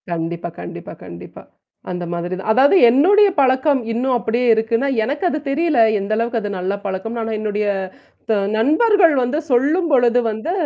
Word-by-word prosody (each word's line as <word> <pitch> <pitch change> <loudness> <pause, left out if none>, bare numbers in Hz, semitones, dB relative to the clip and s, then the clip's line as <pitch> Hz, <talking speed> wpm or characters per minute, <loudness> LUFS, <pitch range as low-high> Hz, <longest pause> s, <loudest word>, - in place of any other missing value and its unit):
கண்டிப்பா 170 0 -4
கண்டிப்பா 85 - -9
கண்டிப்பா. 85 0 -11 0.5
அந்த 180 0 -5
மாதிரி 175 +1 -4
தான். 195 - -6
அதாவது 270 - +4
என்னுடைய 385 - +4
பழக்கம் 265 +1 +2
இன்னும் 250 +2 -1
அப்டியே 240 +1 -1
இருக்குன்னா, 230 +4 -1 0.2
எனக்கு 285 - -4
அது 305 - -3
தெரியல. 315 0 0 0.2
எந்த 200 +2 -5
அளவுக்கு 230 +1 -1
அது 205 - -5
நல்ல 185 +2 -2
பழக்கம்னு 200 +5 -4
ஆனா 225 - -4
என்னுடைய 210 -1 -2 0.6
த - - +3 0.2
நண்பர்கள் 335 - +3
வந்து 245 +5 -2
சொல்லும்பொழுது 265 -2 +2
வந்து 220 +10 -5
235 Hz, 150 wpm, -18 LUFS, 205-285 Hz, 0.6 s, அதாவது